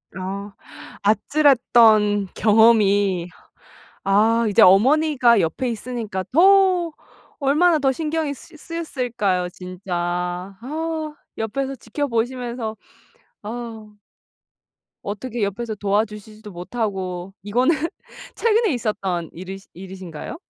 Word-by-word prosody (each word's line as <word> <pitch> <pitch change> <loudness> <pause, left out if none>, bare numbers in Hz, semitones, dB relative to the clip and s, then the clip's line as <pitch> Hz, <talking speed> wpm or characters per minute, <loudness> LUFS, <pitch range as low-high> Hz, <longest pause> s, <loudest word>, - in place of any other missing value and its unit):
아. 195 +2 -5 0.5
아찔했던 220 -3 +4
경험이 205 -5 +4 0.7
아 220 +4 +3
이제 200 - +4
어머니가 250 +3 +5
옆에 170 +10 -1
있으니까 225 -4 -4
더 370 +1 +5 0.5
얼마나 310 +4 +3
더 270 -2 +2
신경이 310 +1 -2
쓰 285 - -15
쓰였을까요. 245 - -2
진짜. 180 +1 -8 0.7
아 315 +3 -4 0.2
옆에서 270 +5 -3
지켜보시면서 235 -2 -3 0.7
어 220 -1 -7 1.1
어떻게 215 +3 -4
옆에서 220 +3 -3
도와주시지도 210 +1 -3
못하고 185 -1 -4
이거는 245 +10 +2 0.6
최근에 450 -5 +2
있었던 195 -8 -2
일이 185 +3 -8
일이신가요? 185 - -8
225 Hz, 230 characters per minute, -22 LUFS, 195-270 Hz, 1.1 s, 어머니가